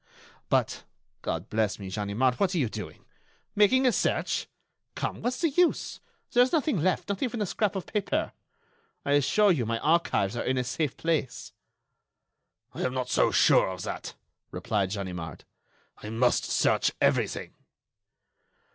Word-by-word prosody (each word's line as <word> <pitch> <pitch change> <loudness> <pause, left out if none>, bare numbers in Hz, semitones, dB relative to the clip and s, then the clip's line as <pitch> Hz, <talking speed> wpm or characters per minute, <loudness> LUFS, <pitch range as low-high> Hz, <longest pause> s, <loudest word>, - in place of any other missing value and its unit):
But, - - +1 0.4
God - - -3
bless 110 -2 0
me, 95 -2 -8
Ganimard, 105 +6 0
what 195 -2 +1
are - - +1
you 130 -8 +1
doing? 105 -3 -8 0.5
Making 255 +6 +4
a 250 - +5
search? - - 0 0.5
Come, - - -3
what's 250 +5 -2
the 330 -3 +2
use? 355 +4 +1 0.3
There 245 - +5
is 250 - +3
nothing 300 - +1
left—not 185 +3 0
even 245 -3 -2
a 210 - 0
scrap 205 +2 -1
of 190 - -3
paper. 210 -2 -1 0.7
I 140 - 0
assure 165 +9 +4
you 145 -9 +1
my 115 +1 -1
archives 150 - +1
are 120 - -2
in 130 0 0
a 125 - +1
safe 140 +2 -2
place." 160 -6 -2 1.2
"I - - -6
am 130 - -1
not 125 -1 -2
so - - +3
sure - - +4
of 95 -1 -5
that," - - -6 0.3
replied 100 -3 -1
Ganimard. 90 -6 -5 0.6
"I 105 - -7
must 120 +3 +2
search - - +2
everything." - - 0
140 Hz, 155 wpm, -27 LUFS, -, 1.2 s, a